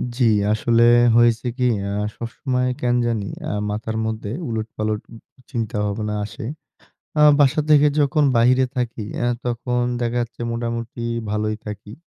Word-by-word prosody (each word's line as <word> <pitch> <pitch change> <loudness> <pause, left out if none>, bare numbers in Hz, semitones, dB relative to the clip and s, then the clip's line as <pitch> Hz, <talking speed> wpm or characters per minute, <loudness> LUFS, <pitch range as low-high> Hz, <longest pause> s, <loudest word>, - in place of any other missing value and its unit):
জি, 130 - +1 0.3
আসলে 115 +1 +2 0.3
হয়েছে 120 0 +3
কি? 125 -1 +2 0.2
আ - - -3 0.2
সবসময় 125 +2 -2
কেন 120 0 +2
জানি 110 -4 -1 0.2
আ - - -2 0.2
মাথার 110 +1 -3
মধ্যে 110 -1 -4 0.2
উলটপালট 110 -1 -3 0.5
চিন্তাভাবনা 105 -3 -2
আসে। 110 - -8 0.7
আ - - +4 0.2
বাসা 145 +2 +4
থেকে 150 0 +6
যখন 145 +1 +2
বাইরে 125 +3 +4
থাকি 120 -3 -2
অ্যা 120 - 0 0.2
তখন 120 +1 -1 0.2
দেখা 120 0 -1
যাচ্ছে 120 0 -9
মোটামুটি 115 0 -4 0.3
ভালোই 105 0 -1
থাকি। 105 0 -7
115 Hz, 135 wpm, -21 LUFS, 110-125 Hz, 0.7 s, থেকে